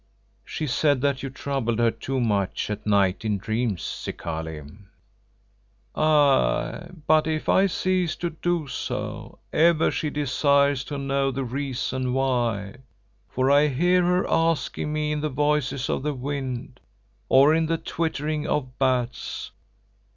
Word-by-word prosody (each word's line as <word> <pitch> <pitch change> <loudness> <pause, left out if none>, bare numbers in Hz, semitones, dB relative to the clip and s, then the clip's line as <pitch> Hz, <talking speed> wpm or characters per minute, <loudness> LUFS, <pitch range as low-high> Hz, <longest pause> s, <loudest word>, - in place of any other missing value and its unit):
"She 155 - -4
said 145 0 +2
that 140 -1 0
you 135 - -4
troubled 130 -4 -2
her 115 -1 +3
too 130 +4 -3
much 105 -4 0
at 105 0 -5
night 100 -2 +2
in 105 -2 0
dreams, 110 -1 -2
Zikali." 80 -2 -5 1.3
"Aye, 145 - +2 0.2
but 155 0 +4
if 155 -1 -2
I 195 +1 +4
cease 185 -2 0
to 175 -1 -3
do 170 -1 -1
so, 125 - -5 0.2
ever 165 0 +4
she 155 - -2
desires 140 -1 +2
to 145 - -5
know 135 0 0
the 135 0 -3
reason 130 0 -2
why, 120 -6 0 0.5
for 130 +2 +1
I 145 +1 +5
hear 175 +6 +2
her 180 +1 +2
asking 165 -2 0
me 150 0 -1
in 150 -1 -1
the 155 - -1
voices 145 -2 0
of - - -1
the 150 +1 -2
wind, 130 -2 -5 0.5
or 140 +3 +6
in 160 0 +2
the 165 +1 0
twittering 155 -2 -2
of 130 -3 -2
bats. 125 -3 -1
140 Hz, 140 wpm, -25 LUFS, 125-155 Hz, 1.3 s, or